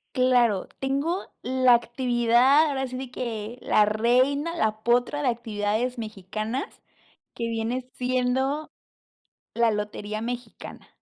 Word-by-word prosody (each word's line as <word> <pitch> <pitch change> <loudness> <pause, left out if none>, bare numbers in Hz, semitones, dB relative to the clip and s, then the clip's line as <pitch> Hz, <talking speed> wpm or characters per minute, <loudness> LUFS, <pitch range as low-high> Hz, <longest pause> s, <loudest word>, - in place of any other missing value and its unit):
Claro, 245 -6 +3
tengo 280 +8 -2
la 255 -1 +4
actividad, 240 +4 +3
ahora 270 -2 -1
sí 255 0 -6
de 260 -1 -6
que 230 -2 -5
la 210 - +4
reina, 255 +9 +1
la 215 -3 0
potra 245 +5 +2
de 265 - +2
actividades 230 +1 -2
mexicanas, 215 +3 -5 0.5
que 230 - -3
viene 235 +3 -3
siendo 255 +4 0 0.9
la 235 -1 +3
lotería 210 0 -4
mexicana. 240 -1 -7
245 Hz, 115 wpm, -25 LUFS, 220-260 Hz, 0.9 s, la